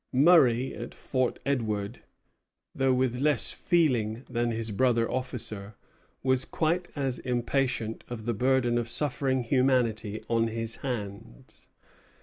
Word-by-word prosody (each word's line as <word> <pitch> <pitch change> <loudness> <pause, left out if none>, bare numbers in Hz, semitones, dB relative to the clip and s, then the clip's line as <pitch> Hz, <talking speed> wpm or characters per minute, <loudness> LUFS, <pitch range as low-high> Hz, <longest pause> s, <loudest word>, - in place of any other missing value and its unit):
Murray, 130 -4 +5
at - - -7
Fort 130 -2 -1
Edward, 110 -7 -2 0.7
though 135 0 +2
with 125 -1 +1
less 150 0 +2
feeling 125 - +1
than 120 0 -1
his 115 -1 -3
brother 115 +1 +2
officer, 110 -5 -4 0.5
was 130 0 +2
quite 170 +2 -1
as 135 -3 -2
impatient 125 -2 -1
of 115 -3 -6
the 120 - 0
burden 120 +1 +2
of 115 0 -3
suffering 130 -1 0
humanity 115 -4 +1
on 115 -1 +2
his 115 0 -2
hands. 100 - -7
125 Hz, 125 wpm, -28 LUFS, 115-130 Hz, 0.7 s, Murray